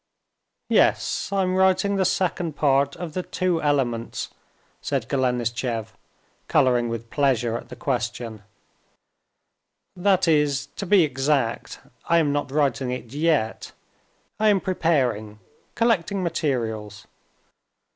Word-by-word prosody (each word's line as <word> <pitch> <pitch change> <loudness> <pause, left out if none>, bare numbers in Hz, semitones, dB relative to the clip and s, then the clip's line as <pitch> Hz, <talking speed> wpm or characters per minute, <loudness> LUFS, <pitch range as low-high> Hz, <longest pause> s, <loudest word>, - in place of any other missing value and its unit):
"Yes, - - +2
I'm 190 -2 +1
writing 190 +1 +3
the 190 -1 +1
second 175 -4 0
part 140 -1 +2
of 170 -4 -6
the 185 - -1
Two 180 -2 -1
Elements," 130 -6 -1 0.5
said 135 -6 -2
Golenishtchev, 120 -3 -1 0.6
coloring 120 -2 +3
with 115 0 -6
pleasure 125 -5 +1
at - - -7
the - - -8
question—"that 120 - -5
is, 150 -3 +2
to 200 - -4
be 195 -2 +6
exact, 135 -4 -1 0.2
I 170 - +3
am 155 -3 +2
not 145 -1 -1
writing 140 -3 +1
it 125 -1 -5
yet; 150 -7 0 0.7
I 215 0 +4
am 200 -2 +4
preparing, 130 - 0 0.4
collecting 200 -5 +1
materials. 115 - -2
140 Hz, 110 wpm, -24 LUFS, 120-175 Hz, 0.7 s, be